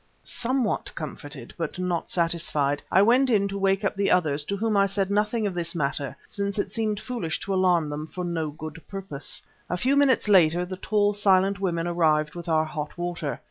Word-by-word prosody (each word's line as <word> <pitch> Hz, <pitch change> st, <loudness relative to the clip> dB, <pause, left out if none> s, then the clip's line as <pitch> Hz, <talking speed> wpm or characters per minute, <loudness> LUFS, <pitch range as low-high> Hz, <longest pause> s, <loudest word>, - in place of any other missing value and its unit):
Somewhat 245 Hz, -2 st, -1 dB
comforted, 145 Hz, -4 st, -8 dB
though 165 Hz, -, -2 dB
not 180 Hz, -2 st, -2 dB
satisfied, 165 Hz, -4 st, 0 dB
I 190 Hz, -, +6 dB
went 255 Hz, +5 st, +4 dB
in 200 Hz, -4 st, +3 dB
to 200 Hz, -, -4 dB
wake 195 Hz, +1 st, +1 dB
up -, -, 0 dB
the 200 Hz, 0 st, +1 dB
others, 150 Hz, -5 st, +3 dB
to 200 Hz, -, -2 dB
whom 220 Hz, +1 st, 0 dB
I 200 Hz, 0 st, +4 dB
said 195 Hz, 0 st, -1 dB
nothing 210 Hz, +2 st, +1 dB
of 200 Hz, -, -1 dB
this 170 Hz, -1 st, -2 dB
matter 140 Hz, -3 st, -2 dB
since 200 Hz, 0 st, -3 dB
it 200 Hz, -1 st, -1 dB
seemed 215 Hz, -1 st, -1 dB
foolish 210 Hz, -10 st, -3 dB
to 195 Hz, -, -2 dB
alarm 180 Hz, -4 st, +3 dB
them 150 Hz, +1 st, -5 dB
for 180 Hz, +2 st, -5 dB
no 165 Hz, -3 st, -2 dB
good 155 Hz, +1 st, -8 dB
purpose. 195 Hz, -8 st, -4 dB, 0.3 s
A 180 Hz, -, -1 dB
few 260 Hz, +9 st, +2 dB
minutes 275 Hz, -6 st, +3 dB
later 175 Hz, -3 st, +5 dB
the 185 Hz, +1 st, -6 dB
tall, 205 Hz, +1 st, +1 dB
silent 195 Hz, -1 st, +3 dB
women 170 Hz, -4 st, -1 dB
arrived 155 Hz, -3 st, +2 dB
with 170 Hz, -1 st, -7 dB
our 160 Hz, -1 st, +3 dB
hot 150 Hz, 0 st, -6 dB
water. 175 Hz, -4 st, -3 dB
180 Hz, 200 wpm, -25 LUFS, 160-200 Hz, 0.3 s, I